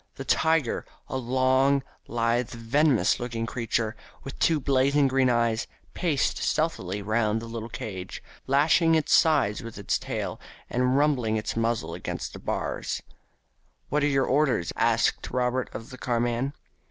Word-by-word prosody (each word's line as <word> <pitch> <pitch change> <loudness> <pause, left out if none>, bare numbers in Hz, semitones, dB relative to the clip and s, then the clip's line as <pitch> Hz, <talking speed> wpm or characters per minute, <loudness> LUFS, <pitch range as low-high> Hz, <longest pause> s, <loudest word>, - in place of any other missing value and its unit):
The - - -7
tiger, 160 -6 +2 0.3
a - - -4
long, 130 +2 +2 0.2
lithe, 115 0 0
venomous 125 +3 +2
looking 115 -2 -3
creature, 115 -1 -2 0.3
with 135 - -8
two 160 -2 +3
blazing 140 +1 +3
green 130 -1 +2
eyes, 115 -1 +1 0.3
paced 160 -7 0
stealthily 105 - -1
round 110 +1 +1
the 115 - -8
little 115 0 -6
cage, 105 -6 -6 0.2
lashing 160 +4 +4
its 155 -2 +1
sides 140 -10 +4
with 115 -3 -9
its 100 - -1
tail, - - -4 0.3
and 125 +2 +2
rubbing 130 -7 +2
its 110 - -3
muzzle 115 0 -1
against - - -5
the - - -8
bars. - - -3 0.9
"What 150 +2 +1
were 145 - +3
your 135 -2 +2
orders?" 135 - +1
asked - - +1
Robert 125 0 0
of 115 - -8
the 130 - -10
carman. 120 +2 0
125 Hz, 145 wpm, -26 LUFS, 115-140 Hz, 0.9 s, lashing